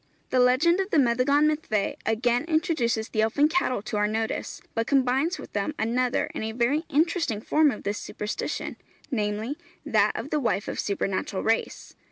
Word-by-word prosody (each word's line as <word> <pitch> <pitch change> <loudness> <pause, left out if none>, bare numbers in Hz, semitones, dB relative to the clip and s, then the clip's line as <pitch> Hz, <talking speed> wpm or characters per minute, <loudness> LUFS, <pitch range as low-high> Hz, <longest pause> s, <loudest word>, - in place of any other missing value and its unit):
The 255 - +3
legend 265 +9 +4
of 385 0 -1
the - - +2
Meddygon 265 +3 +3
Myddfai 300 -10 0
again 240 +3 +1
introduces 315 -9 0
the 215 - 0
elfin 240 +7 +3
cattle 305 - 0
to 215 -1 -3
our 210 0 +2
notice, 220 +1 -3
but 230 0 -1
combines 275 +6 +2
with - - -11
them 205 +9 -2
another 245 +3 0
and - - -4
a 220 0 -3
very 260 +7 +1
interesting 320 - +1
form 305 +7 +3
of 215 - -5
this 205 +1 -2
superstition, 210 +1 -4 0.3
namely, 220 +5 -2 0.3
that 215 -1 +3
of 275 - -5
the 300 - +2
wife 210 -6 0
of - - -4
supernatural 195 -1 -2
race. 225 0 -1
245 Hz, 175 wpm, -26 LUFS, 220-295 Hz, 0.3 s, legend